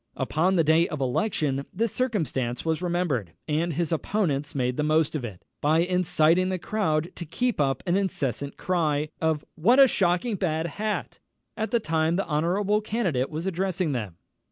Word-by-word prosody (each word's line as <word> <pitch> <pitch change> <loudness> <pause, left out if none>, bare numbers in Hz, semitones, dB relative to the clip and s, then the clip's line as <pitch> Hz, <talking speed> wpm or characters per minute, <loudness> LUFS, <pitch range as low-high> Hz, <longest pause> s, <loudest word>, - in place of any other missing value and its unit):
_" - - -18
Upon 160 +8 +1
the 165 - +4
day 160 +2 +4
of 150 - -5
election 140 - 0
this 225 +3 -1
circumstance 155 - -1
was 160 +1 0
remembered, 170 - -1
and 160 +3 0
his 170 +3 -1
opponents 155 -5 -1
made 125 -2 0
the - - -1
most 155 +1 +2
of 145 - -2
it, 105 -7 -8 0.2
by 155 +3 +3
inciting 180 0 +2
the 185 - -1
crowd 170 -4 -1
to - - -6
keep 230 +5 -1
up 135 -2 0
an 175 -1 +1
incessant 140 - -2
cry 155 -5 0
of 160 -2 0
"What 230 - +4
a 270 - +9
shocking 195 +1 +1
bad 160 -3 -1
hat!" 210 +6 -3 0.4
all 220 -1 -1
the 235 - +1
time 165 -4 +1
the 195 - 0
honourable 190 +7 +1
candidate 185 - -1
was 160 +2 -5
addressing 185 -2 -1
them. 105 -10 -4
165 Hz, 180 wpm, -26 LUFS, 150-190 Hz, 0.4 s, a